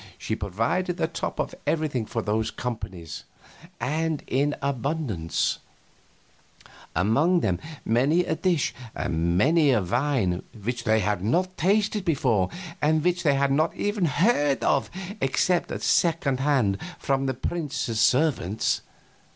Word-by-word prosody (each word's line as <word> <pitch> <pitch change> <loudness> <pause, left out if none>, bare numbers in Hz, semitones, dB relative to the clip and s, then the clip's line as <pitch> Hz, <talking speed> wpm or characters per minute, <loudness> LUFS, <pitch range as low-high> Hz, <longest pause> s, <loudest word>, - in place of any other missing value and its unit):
She 110 - -3
provided 115 - -1
the - - +1
top 165 - -4
of - - -1
everything 150 -8 0
for 115 - -3
those 110 +1 0
companies, 95 -11 -6 0.6
and 160 +2 -1
in 145 +3 +1
abundance 135 - -1 1.4
among 140 - +3
them 90 -4 0 0.3
many 140 +10 +3
a 160 - 0
dish 170 -2 +1 0.2
and 85 +1 0
many 155 - +4
a 120 - +4
wine 115 -4 0 0.2
which 120 +3 -3
they 110 0 +3
had 100 -2 -1
not 180 - +1
tasted 205 +3 +1
before 125 - +1 0.3
and 155 +1 +2
which 180 0 +1
they 145 -4 +3
had 140 0 +2
not 155 +4 +2
even 205 -2 0
heard 150 - +2
of 140 - +2 0.3
except 170 +6 +1
at - - -4
second 155 -6 +2
hand 130 -9 +2 0.2
from 135 0 0
the 130 - -1
prince's 140 -6 -2
servants. 125 - +2
140 Hz, 135 wpm, -25 LUFS, 110-160 Hz, 1.4 s, many